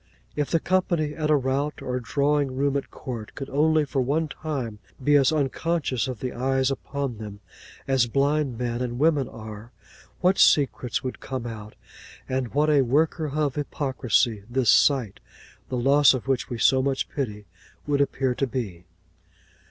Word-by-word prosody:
If 150 -1 -1
the 165 - +2
company 175 -4 0
at 155 0 -2
a 155 - +5
rout, 140 +2 -1
or 125 0 -3
drawing 140 +2 0
room 140 +1 0
at 140 - -2
court, 115 -4 -7
could 135 -1 -7
only 155 +2 +3
for 135 -1 -1
one 150 +5 0
time 135 -9 -5 0.2
be 145 +2 +4
as 140 -1 +5
unconscious 150 -3 -1
of 125 -4 -6
the 125 - -3
eyes 130 +1 +1
upon 135 -3 -4
them 105 -2 -8 0.5
as 135 -3 +3
blind 140 0 +1
men 120 0 -2
and 120 -1 -3
women 145 -2 +2
are, 110 +1 -10 0.5
what 185 +1 +2
secrets 135 -4 +3
would 130 - -5
come 130 -2 -5
out, 110 -2 -8 0.5
and 130 -1 -3
what 150 +1 +3
a 145 -2 +5
worker 155 +5 +1
of 150 -3 +1
hypocrisy 130 -6 0
this 125 0 +3
sight, 130 -9 +3 0.5
the 130 - -2
loss 140 +3 +5
of 130 - -6
which 135 -3 0
we 120 - -4
so 130 +3 +4
much 135 0 -1
pity, 105 -7 -4 0.4
would 145 -1 +1
appear 135 -2 0
to 135 +2 -1
be! 100 -9 -5
135 Hz, 170 wpm, -25 LUFS, 120-145 Hz, 0.5 s, a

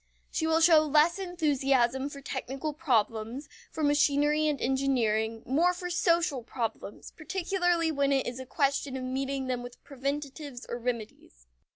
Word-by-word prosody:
She 320 - -1
will 320 0 +3
show 325 -1 +7
less 310 +4 +3
enthusiasm 275 -7 +1
for 280 -1 -10
technical 270 +2 -4
problems, 240 -3 -1 0.2
for 315 - -4
machinery 295 +1 +3
and 295 -2 0
engineering; 230 -4 0
more 335 +8 +2
for 355 0 -5
social 335 -6 +2
problems, 230 -3 -5
particularly 350 -1 0
when 280 -2 +1
it 270 -1 +2
is 245 +1 -5
a 260 - -8
question 275 -1 0
of 255 - -5
meeting 265 +1 -2
them 250 -1 -2
with 245 0 -11
preventives 280 -1 -5
or 240 - -4
remedies. 225 - -5
275 Hz, 150 wpm, -29 LUFS, 250-310 Hz, 0.2 s, show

